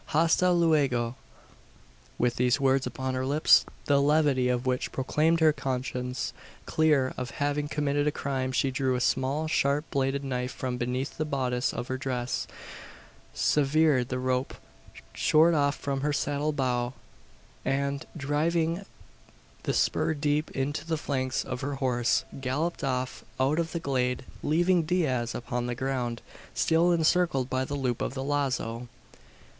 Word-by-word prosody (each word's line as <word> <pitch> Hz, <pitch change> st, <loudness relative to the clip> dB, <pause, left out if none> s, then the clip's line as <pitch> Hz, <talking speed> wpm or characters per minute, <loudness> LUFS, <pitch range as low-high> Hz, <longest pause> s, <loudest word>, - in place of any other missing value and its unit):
Hasta 165 Hz, +3 st, +3 dB
luego!" 140 Hz, -9 st, +2 dB, 1.0 s
With 120 Hz, 0 st, +1 dB
these 125 Hz, +2 st, +2 dB
words 135 Hz, 0 st, +2 dB
upon 130 Hz, 0 st, -3 dB
her 130 Hz, 0 st, -1 dB
lips 145 Hz, +4 st, +5 dB, 0.2 s
the 140 Hz, -1 st, +3 dB
levity 145 Hz, -3 st, +3 dB
of 125 Hz, 0 st, 0 dB
which 125 Hz, -1 st, -1 dB
proclaimed 155 Hz, +5 st, +1 dB
her 155 Hz, -1 st, +6 dB
conscience 125 Hz, -2 st, -3 dB, 0.3 s
clear 150 Hz, -5 st, +2 dB
of 125 Hz, -1 st, -3 dB
having 145 Hz, +1 st, 0 dB
committed 145 Hz, -1 st, 0 dB
a -, -, +3 dB
crime 130 Hz, -2 st, -2 dB
she 135 Hz, +1 st, +1 dB
drew 130 Hz, 0 st, 0 dB
a -, -, 0 dB
small 135 Hz, +5 st, 0 dB
sharp 145 Hz, 0 st, +1 dB
bladed 135 Hz, 0 st, 0 dB
knife 125 Hz, -2 st, -2 dB
from 125 Hz, -1 st, -4 dB
beneath 125 Hz, +3 st, -3 dB
the 155 Hz, -, 0 dB
bodice 130 Hz, -4 st, -1 dB
of 120 Hz, -, -5 dB
her 130 Hz, 0 st, -3 dB
dress; 130 Hz, -2 st, -2 dB, 0.9 s
severed 145 Hz, -3 st, +3 dB
the 130 Hz, -, -2 dB
rope 130 Hz, 0 st, -1 dB, 0.6 s
short 160 Hz, +2 st, +4 dB
off 145 Hz, -2 st, +2 dB
from 135 Hz, -1 st, -3 dB
her 150 Hz, +1 st, +1 dB
saddle 145 Hz, +1 st, 0 dB
bow; 125 Hz, -3 st, -1 dB, 0.7 s
and, 140 Hz, 0 st, -1 dB
driving 160 Hz, +4 st, 0 dB, 0.8 s
the -, -, 0 dB
spur 160 Hz, -, +1 dB
deep 145 Hz, +1 st, 0 dB
into 140 Hz, +3 st, -2 dB
the 160 Hz, -1 st, -2 dB
flanks 130 Hz, -3 st, -1 dB
of 130 Hz, -1 st, -4 dB
her 140 Hz, +1 st, -2 dB
horse, 125 Hz, -3 st, +1 dB
galloped 145 Hz, +6 st, -2 dB
off 130 Hz, -1 st, -2 dB, 0.2 s
out 140 Hz, +5 st, +2 dB
of 165 Hz, -1 st, -1 dB
the 170 Hz, -, -2 dB
glade 125 Hz, -4 st, -1 dB, 0.2 s
leaving 175 Hz, +4 st, +3 dB
Diaz 150 Hz, -8 st, 0 dB
upon 120 Hz, 0 st, -3 dB
the 120 Hz, -, -2 dB
ground, 125 Hz, -3 st, -2 dB, 0.3 s
still 165 Hz, +2 st, +3 dB
encircled 165 Hz, -5 st, +2 dB
by 130 Hz, 0 st, +1 dB
the 145 Hz, +2 st, -4 dB
loop 125 Hz, -4 st, -1 dB
of 135 Hz, -, -2 dB
the 135 Hz, -, -3 dB
lazo! 130 Hz, -4 st, -1 dB
135 Hz, 150 wpm, -28 LUFS, 130-150 Hz, 1.0 s, her